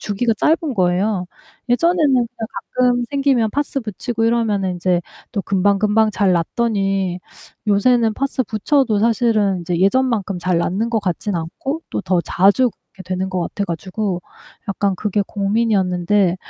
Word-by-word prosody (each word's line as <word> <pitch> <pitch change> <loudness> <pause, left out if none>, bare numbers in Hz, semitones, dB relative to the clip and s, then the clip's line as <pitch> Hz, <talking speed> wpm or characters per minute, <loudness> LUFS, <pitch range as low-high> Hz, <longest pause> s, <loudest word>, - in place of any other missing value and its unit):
주기가 225 +3 0
짧은 310 - +1
거예요. 185 +1 +1 0.4
예전에는 335 +7 +2
그냥 245 -2 +2 0.5
가끔 245 -1 +2
생기면 275 -6 +2
파스 285 +2 -2
붙이고 225 +1 -3
이러면은 215 -5 +1
인제 180 0 0 0.3
또 205 - -1
금방금방 205 +3 +2
잘 200 -3 +2
낫더니 195 0 0 0.5
요새는 225 +2 +3
파스 270 0 -1
붙여도 225 +1 +1
사실은 215 -4 +2
이제 170 0 -2
예전만큼 205 -2 +1
잘 180 -1 +1
낫는 195 +7 -1
것 230 - +1
같지는 185 0 -2
않고 265 - -5
또 - - -2
더 185 -3 +1
자주 200 +9 +3 0.2
이렇게 195 - -10
되는 185 +1 -3
것 185 -1 -1
같아가지고 185 +1 -3 0.5
약간 200 0 0
그게 205 +1 0
고민이었는데 195 -3 +1
205 Hz, 325 characters per minute, -19 LUFS, 185-235 Hz, 0.5 s, 요새는